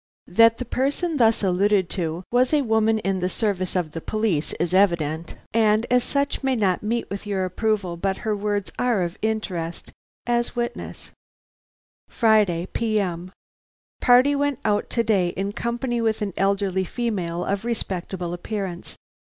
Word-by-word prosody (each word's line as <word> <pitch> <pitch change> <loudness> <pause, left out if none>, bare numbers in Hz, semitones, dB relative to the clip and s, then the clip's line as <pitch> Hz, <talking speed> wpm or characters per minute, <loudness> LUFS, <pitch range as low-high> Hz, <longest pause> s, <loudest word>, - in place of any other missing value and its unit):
That 230 0 +6
the 250 - -4
person 290 +7 -1
thus 225 -3 +3
alluded 195 0 +2
to 170 -1 -3
was 250 +4 +3
a 290 - +2
woman 220 -1 +2
in 195 -3 -1
the 180 0 0
service 190 -4 -1
of 175 -4 -1
the 165 - -6
police 215 -8 -1
is 175 +1 -2
evident, 170 -4 +1 0.2
and 220 0 +3
as 250 -1 +4
such 280 0 -1
may 265 -1 +2
not 195 -6 +1
meet 230 +3 -1
with 200 +1 -5
your 195 -2 0
approval, 190 -2 -1
but 190 +2 -1
her 215 -1 +1
words 205 -1 -2
are 240 -7 +2
of 170 +1 -5
interest, 185 -7 -3 0.3
as 240 0 0
witness: 240 0 -4 1.0
"Friday 210 -7 +3
P.M. 190 -6 -1 0.7
"Party 255 +4 +5
went 285 -2 0
out 210 -1 +1
to 230 - 0
day 200 -5 +2
in 195 +1 -1
company 235 +2 -2
with 220 -1 0
an 200 -3 -3
elderly 195 -1 +1
female 185 -5 -2
of 200 +1 -1
respectable 185 -6 -3
appearance. 185 -1 -5
205 Hz, 155 wpm, -23 LUFS, 185-230 Hz, 1.0 s, That